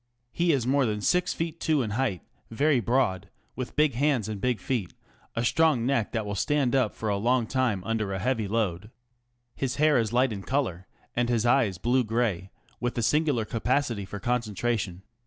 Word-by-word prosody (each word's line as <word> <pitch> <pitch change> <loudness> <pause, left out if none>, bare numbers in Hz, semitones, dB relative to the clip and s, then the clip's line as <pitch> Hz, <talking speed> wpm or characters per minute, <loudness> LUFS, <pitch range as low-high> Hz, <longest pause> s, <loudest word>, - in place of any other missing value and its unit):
He 170 +4 +2
is 135 -6 +1
more 135 0 +2
than 105 -1 -1
six 180 +10 +1
feet 165 0 -4
two 155 -5 +1
in 110 - -4
height, 110 - -1 0.3
very 140 +4 +2
broad, 105 -5 0 0.3
with 130 -1 -5
big 150 -2 +3
hands 130 -4 +1
and 105 -3 -5
big 125 -1 0
feet, 115 -9 -3 0.4
a 115 - 0
strong 155 -4 +3
neck 125 -5 0
that 110 -3 -2
will 100 - -3
stand 135 +5 +1
up 125 -5 +1
for 110 - -4
a 100 -1 +1
long 120 +3 +2
time 120 -6 0
under 110 -1 -1
a 95 - -2
heavy 110 +1 -1
load. 105 -2 -1 0.7
His 135 -2 -2
hair 150 -2 +4
is 110 -2 -1
light 125 0 +2
in 100 - -5
colour, 95 -8 -2 0.3
and 120 0 +1
his 120 -2 +1
eyes 120 -6 +3
blue 125 +7 +2
gray, 110 -5 -1 0.3
with 120 0 -2
a 120 - 0
singular 145 -4 +2
capacity 120 0 0
for 100 +2 -7
concentration. 110 -4 -2
120 Hz, 195 wpm, -27 LUFS, 105-135 Hz, 0.7 s, hair